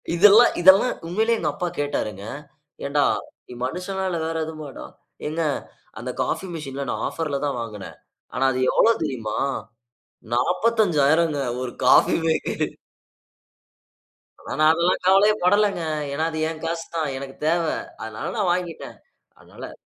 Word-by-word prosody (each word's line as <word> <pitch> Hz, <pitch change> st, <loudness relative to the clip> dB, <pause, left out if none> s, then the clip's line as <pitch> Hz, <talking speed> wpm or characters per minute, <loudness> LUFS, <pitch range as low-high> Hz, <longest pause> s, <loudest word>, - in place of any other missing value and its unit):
இதெல்லாம், 210 Hz, +6 st, +7 dB
இதெல்லாம் 190 Hz, +7 st, +6 dB
உண்மையிலே 220 Hz, +6 st, +1 dB
எங்க -, -, 0 dB
அப்பா 180 Hz, -2 st, -2 dB
கேட்டாருங்க. 105 Hz, -8 st, -3 dB, 0.6 s
ஏன்டா! 140 Hz, 0 st, +2 dB, 0.4 s
நீ -, -, -10 dB
மனுஷனா 185 Hz, +7 st, -4 dB
இல்ல 175 Hz, -, -2 dB
வேற 165 Hz, 0 st, -3 dB
எதுமாடா? 155 Hz, -4 st, -8 dB, 0.4 s
ஏங்க 155 Hz, +2 st, -2 dB, 0.6 s
அந்த -, -, -5 dB
காஃபி 190 Hz, -, -3 dB
மெஷின்ல 140 Hz, -3 st, -5 dB
நான் -, -, -3 dB
ஆஃபர்‌லதான் 145 Hz, -4 st, -2 dB
வாங்கினேன். 105 Hz, -4 st, -8 dB, 0.4 s
ஆனா, 130 Hz, +2 st, -1 dB
அது 130 Hz, -, -1 dB
எவ்ளோ 230 Hz, -, +5 dB
தெரியுமா? 115 Hz, -8 st, -3 dB, 1.0 s
45,000 170 Hz, -, +2 dB
ங்க. 145 Hz, -, -2 dB, 0.2 s
ஒரு 125 Hz, -, -4 dB
காஃபி -, -, +6 dB
மேக்கரு. 160 Hz, -1 st, 0 dB, 1.7 s
ஆனா, -, -, -10 dB
நான் 155 Hz, 0 st, +6 dB
அதெல்லாம் 170 Hz, +2 st, +1 dB
கவலையே 195 Hz, +3 st, +5 dB
படலங்க. 205 Hz, -1 st, +3 dB, 0.3 s
ஏன்னா, 155 Hz, +3 st, -1 dB
அது 160 Hz, -, -4 dB
என் 155 Hz, -1 st, -7 dB
காசு 165 Hz, 0 st, -3 dB
தான். 160 Hz, -3 st, 0 dB
எனக்கு 135 Hz, 0 st, -8 dB
தேவ. 170 Hz, +1 st, +2 dB, 0.4 s
அதனால 110 Hz, -1 st, -5 dB
நான் 190 Hz, -4 st, +2 dB
வாங்கிட்டேன். 175 Hz, -2 st, -5 dB, 0.4 s
அதனால -, -, -10 dB
160 Hz, 135 wpm, -23 LUFS, 140-185 Hz, 1.7 s, இதெல்லாம்